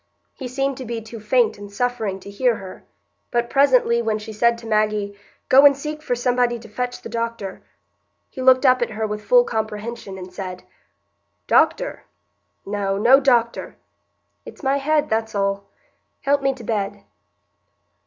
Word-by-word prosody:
He 260 - -7
seemed 270 +1 -2
to 260 - -6
be 235 0 -4
too 225 +1 -10
faint 220 0 +1
and 205 0 -10
suffering 220 -3 -2
to - - -10
hear 240 +3 +1
her; 190 -3 -10 0.5
but 240 0 -1
presently, 255 -4 +4
when 220 -2 0
she 215 +1 -8
said 235 +2 +2
to 230 - -12
Maggie, 215 -2 0 0.3
"Go 270 +2 +7
and 280 -1 +7
seek 300 +2 -5
for 250 -5 -1
somebody 245 0 +1
to 230 -1 -13
fetch 245 +3 -4
the - - -6
doctor," 230 -4 -4 0.7
he 260 - -8
looked 255 +1 +5
up 255 -1 +5
at 240 - 0
her 220 0 -3
with 210 0 -4
full - - +5
comprehension, 220 - -4
and 185 -1 -9
said, 185 -1 -6 0.8
"Doctor? - - +2 0.6
No—no 205 +5 +3
doctor. 240 -4 +1 0.7
It's - - -13
my 270 +1 +2
head, 300 +2 +1
that's 220 0 -2
all. 200 0 -1 0.6
Help 280 0 +2
me 270 -1 +1
to 245 - -11
bed." 205 -2 -3
235 Hz, 165 wpm, -22 LUFS, 210-255 Hz, 0.8 s, Go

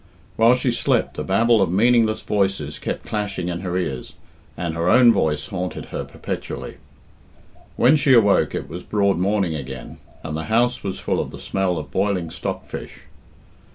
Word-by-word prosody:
While 115 +2 +5
she 125 0 0
slept 120 - 0
a - - -1
babel 110 +3 +3
of 95 -3 +2
meaningless 110 +2 +3
voices 95 -8 -1
kept - - -4
clashing 100 -4 -3
in 85 -1 -3
her 90 -1 -3
ears, 75 -9 -4 0.4
and 85 -2 -2
her 85 +2 0
own 120 +2 +7
voice 75 -5 0
haunted 90 -1 -4
her - - -2
perpetually. - - -6 1.0
When 130 +6 +5
she 140 -3 +4
awoke 105 -4 +4
it - - -4
was 85 +3 -7
broad 100 -2 +1
morning 95 -2 +1
again, 65 -4 -7 0.3
and 80 -1 -4
the 80 0 -4
house 120 +4 +1
was 95 -1 -3
full - - -1
of - - -2
the - - -9
smell 95 -2 -1
of 75 -3 -6
boiling 95 -3 0
stock - - -4
fish. - - -8
95 Hz, 175 wpm, -22 LUFS, 85-110 Hz, 1.0 s, own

